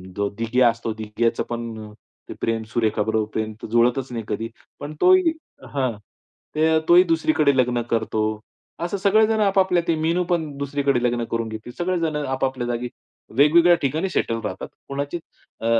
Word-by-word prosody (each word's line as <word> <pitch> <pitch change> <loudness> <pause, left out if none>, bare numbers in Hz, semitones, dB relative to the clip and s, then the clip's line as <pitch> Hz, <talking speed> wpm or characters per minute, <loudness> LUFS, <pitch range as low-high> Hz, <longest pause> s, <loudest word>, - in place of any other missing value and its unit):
जो 100 0 0
दिग्या 120 +2 +3
असतो 115 -1 -3
दिग्याचं 110 +1 -1
पण 115 -2 -6 0.5
प्रेम 115 -1 -1
सुरेखाबरोबर 110 -1 0
प्रेम 110 0 -2 0.2
जुळतच 125 +2 +2
नाही 115 -2 -4
कधी. 115 +2 -3 0.3
पण 145 +1 -6
तो 370 - +7
ही 370 -3 +4 0.4
हां. 130 -3 0 1.0
तो 170 - +6
ही 180 - +8
दुसरीकडे 155 -4 +2
लग्न 125 -1 +2
करतो. 110 -1 0 0.6
असं 175 +4 -2
सगळेजण, 215 +3 +3
आपापल्या 190 -3 +3
मीनू 165 +3 +1
पण 165 -4 0
दुसरीकडे 140 -2 0
लग्न 120 -1 +1
करून 115 -1 -1
घेती. 110 +2 -7
सगळेजण 175 -3 -1
आपापल्या 130 -3 -2
जागी 120 0 -2 0.5
वेगवेगळ्या 170 +4 +6
ठिकाणी 155 +7 0
सेटल 115 -9 -1
राहतात. - - -5 0.2
कोणाची 140 +4 -3 0.4
अ, - - -4
130 Hz, 145 wpm, -22 LUFS, 115-165 Hz, 1.0 s, ही